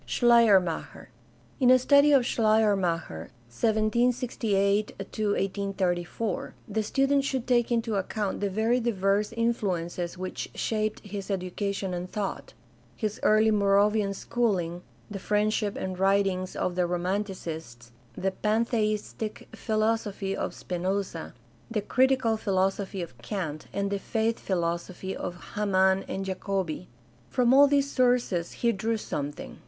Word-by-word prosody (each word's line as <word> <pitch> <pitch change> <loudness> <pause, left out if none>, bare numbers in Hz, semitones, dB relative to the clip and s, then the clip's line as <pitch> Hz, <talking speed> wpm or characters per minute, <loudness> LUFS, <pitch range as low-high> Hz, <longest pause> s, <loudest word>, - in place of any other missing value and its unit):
Schleiermacher. 225 -8 +3 0.3
— - - -31
In 255 -2 +4
a 255 - +8
study 280 +3 +5
of 270 -4 +5
Schleiermacher 195 - +1
(i - - -28 0.2
768 215 - +1
1834) 195 -1 -2
the 220 +1 -1
student 275 +5 +2
should 265 -3 -2
take 245 -1 +2
into 230 -1 0
account 200 +1 -2
the 200 - 0
very 220 +5 +1
diverse 205 -3 +1
influ 230 -6 0
ences 175 +1 -5
which 185 0 -5
shaped 215 -1 -1
his 200 -1 -6
education 195 0 -2
and 180 +1 -5
thought 210 - -4 0.2
— - - -31
his 215 -1 -3
early 215 +1 +4
Moravian 200 0 +3
schooling, 185 -8 -1 0.3
the 200 - -4
friendship 210 +1 0
and 185 -1 -4
writings 195 -1 +1
of 185 - -1
the 180 0 +1
Romanticists, 175 - -4 0.3
the 190 +1 0
Pantheistic 215 0 -1
philosophy 215 -3 -1
of - - -3
Spinoza, 185 -3 -3 0.3
the 225 -2 -1
critical 255 0 +2
philosophy 195 -1 -1
of 165 -7 -10
Kant, 155 - -4
and 200 0 -2
the 200 - -1
faith 225 +2 -1
philosophy 175 +1 -2
of 175 - -5 0.2
Hamann 190 -2 +2
and 195 - -4
Jacobi. 190 -3 -3 0.4
From 250 -1 +3
all 285 +1 +8
these 280 0 +2
sources 245 -9 +1
he 235 - +1
drew 225 +2 -1
some 145 -8 -3
thing. 145 - -10
200 Hz, 130 wpm, -27 LUFS, 185-225 Hz, 0.4 s, a